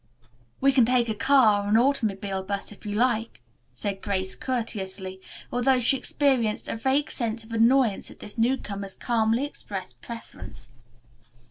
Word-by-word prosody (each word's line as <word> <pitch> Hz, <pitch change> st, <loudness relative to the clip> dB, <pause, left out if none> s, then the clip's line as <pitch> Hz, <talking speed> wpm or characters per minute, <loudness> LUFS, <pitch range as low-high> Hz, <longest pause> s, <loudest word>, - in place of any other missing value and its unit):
"We 275 Hz, +1 st, +4 dB
can 260 Hz, -2 st, +5 dB
take 240 Hz, 0 st, +2 dB
a -, -, +1 dB
car 215 Hz, -4 st, +4 dB
or 205 Hz, -, -3 dB
an 215 Hz, -, +5 dB
automobile 205 Hz, -7 st, +1 dB
bus 200 Hz, +1 st, -4 dB
if 210 Hz, +1 st, -11 dB
you 205 Hz, -, -2 dB
like," 230 Hz, -1 st, 0 dB, 0.4 s
said 200 Hz, -2 st, -3 dB
Grace 190 Hz, -2 st, -1 dB
courteously, 190 Hz, -6 st, -4 dB, 0.3 s
although 250 Hz, +1 st, +3 dB
she 245 Hz, +3 st, +3 dB
experienced 255 Hz, -4 st, +1 dB
a -, -, -2 dB
vague 265 Hz, +5 st, +1 dB
sense 230 Hz, -2 st, -2 dB
of 225 Hz, +1 st, -11 dB
annoyance 230 Hz, -1 st, +3 dB
at -, -, -13 dB
this 205 Hz, -, -8 dB
newcomer's 210 Hz, -5 st, -1 dB
calmly 230 Hz, +2 st, +1 dB
expressed 195 Hz, -9 st, -7 dB
preference. 120 Hz, -, -9 dB
225 Hz, 150 wpm, -26 LUFS, 200-250 Hz, 0.4 s, can